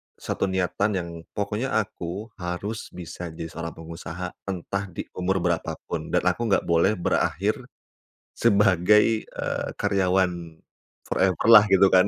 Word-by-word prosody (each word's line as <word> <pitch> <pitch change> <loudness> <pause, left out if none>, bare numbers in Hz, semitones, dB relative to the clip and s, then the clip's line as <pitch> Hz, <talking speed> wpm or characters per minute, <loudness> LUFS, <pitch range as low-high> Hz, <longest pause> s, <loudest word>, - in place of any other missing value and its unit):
1 - - -2
niatan 95 +2 0
yang 85 -2 -2 0.3
pokoknya 105 +5 -2
aku 105 -1 -3
harus 90 +5 -4
bisa 90 0 -7
jadi 80 0 -6
seorang 85 0 -6
pengusaha 85 +2 -7 0.2
entah 100 +1 -3
di 90 - -6
umur 90 0 0
berapa 85 -2 0
pun, - - -3
dan - - +1
aku 120 - +1
enggak 100 - +2
boleh 85 +5 +3
berakhir, 85 - 0 0.8
sebagai, 105 +2 +4
eee, - - -4
karyawan 90 -4 0 0.5
forever 95 +1 +1
lah 110 -3 +10
gitu 95 0 +6
kan. 90 +1 +5
95 Hz, 135 wpm, -25 LUFS, 85-105 Hz, 0.8 s, lah